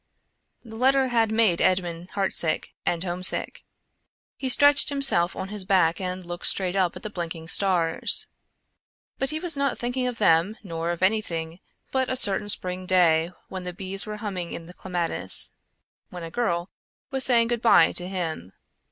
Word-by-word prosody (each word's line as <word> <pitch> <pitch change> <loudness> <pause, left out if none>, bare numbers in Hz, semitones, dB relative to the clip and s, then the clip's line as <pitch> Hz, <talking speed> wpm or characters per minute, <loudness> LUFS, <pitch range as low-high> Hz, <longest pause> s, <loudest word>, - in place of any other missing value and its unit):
The 225 -1 -10
letter 265 +1 +2
had 225 -2 +1
made 220 -6 +2
Edmond 175 -1 -1
heart 195 -1 -1
sick 160 -2 -1
and 170 0 0
home 180 0 -5
sick. 185 - +1 0.7
He 265 - -4
stretched 285 +2 +4
himself 270 -12 +3
on 190 0 -6
his 210 -1 -2
back 185 -3 +1
and 185 0 -5
looked 175 0 -4
straight 185 -1 +2
up 185 -3 0
at - - -10
the 215 - -4
blinking 165 -3 -6
stars. 175 -5 +2 0.9
But 270 - -1
he 310 - -2
was 335 -2 0
not 280 -2 -1
thinking 250 +1 -3
of 245 -2 -5
them 190 +2 +2
nor 165 -3 -5
of 175 +1 -4
anything 170 -5 -1 0.3
but 260 -1 -1
a 260 - -1
certain 205 -4 +5
spring 185 -1 +3
day 170 -2 +2 0.2
when 185 - -7
the 180 0 -6
bees 195 +2 -2
were 210 0 -6
humming 190 -5 -5
in 165 - -8
the 175 - -13
clematis; 175 - -1 0.6
when 180 -1 -9
a 165 - -8
girl 175 -5 -2 0.4
was 265 -1 -1
saying 235 -2 +3
good 240 -2 -2
bye 235 - +5
to 180 - -3
him. 165 - -5
185 Hz, 180 wpm, -24 LUFS, 175-230 Hz, 0.9 s, certain